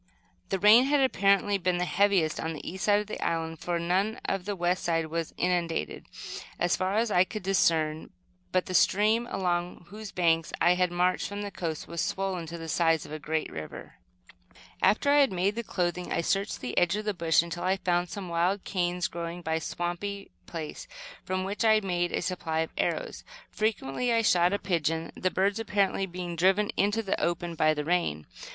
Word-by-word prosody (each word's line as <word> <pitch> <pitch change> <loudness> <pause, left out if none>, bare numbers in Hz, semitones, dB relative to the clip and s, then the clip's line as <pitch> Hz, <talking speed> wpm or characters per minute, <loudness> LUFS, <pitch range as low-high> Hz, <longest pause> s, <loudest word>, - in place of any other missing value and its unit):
The 195 - 0
rain 215 +6 +7
had 290 +1 +3
apparently 200 -5 +3
been 180 -1 +1
the 180 - 0
heaviest 190 -4 +2
on 160 0 -2
the 155 - -8
east 185 +1 -4
side 205 0 +4
of - - -7
the 215 - -5
island, 165 -1 -2
for 175 -1 -2
none 185 +6 0
of 195 -2 -2
the 205 0 -2
west 175 0 0
side 165 -1 +1
was 165 0 -3
inundated, 170 - -1 0.5
as 175 0 +2
far 185 +2 -1
as 230 -1 +1
I 180 - +5
could 210 +2 -7
discern; 160 -5 +1 0.4
but 185 0 +1
the 185 - -5
stream, 215 +6 +3
along 175 -1 -2
whose 210 0 -8
banks 165 -2 +1
I 175 - +5
had 180 0 +1
marched 180 +1 +1
from 205 0 -5
the 205 - -5
coast, 160 -5 -4
was 170 0 -3
swollen 190 -3 -2
to 170 +1 -6
the 165 -1 -7
size 165 -1 +2
of - - -11
a 155 - -5
great 155 +2 -2
river. 75 0 -8 0.8
After 280 +7 +3
I 290 - +6
had 275 -2 +4
made 185 +2 +1
the 235 - -3
clothing, 180 -4 -2
I 170 - +1
searched 195 +5 -1
the 125 -1 -4
edge 175 +2 +2
of 210 0 -4
the 210 - 0
bush 165 -3 +3
until 170 0 -6
I 190 +1 +2
found 175 -1 0
some 195 +2 -6
wild 175 +3 0
canes, 180 -2 -1
growing 170 +1 -6
by 160 - -1
a - - -4
swampy 185 +5 -4 0.2
place, 160 -3 -6 0.4
from 185 0 -2
which 200 +4 -2
I 220 -1 +5
made 175 -3 -1
a - - -1
supply 165 -3 -1
of 160 - -4
arrows. - - -2 0.3
Frequently 215 - -1
I 230 -1 +3
shot 180 -3 +4
a 200 - +1
pigeon, 165 -3 -1
the 185 - 0
birds 200 +4 +1
apparently 200 -3 0
being 175 -1 -5
driven 190 +5 +3
into 205 +3 +1
the 195 - -1
open 170 0 -1
by 155 -1 +2
the 150 0 -3
rain. 160 - 0
180 Hz, 205 wpm, -28 LUFS, 170-200 Hz, 0.8 s, rain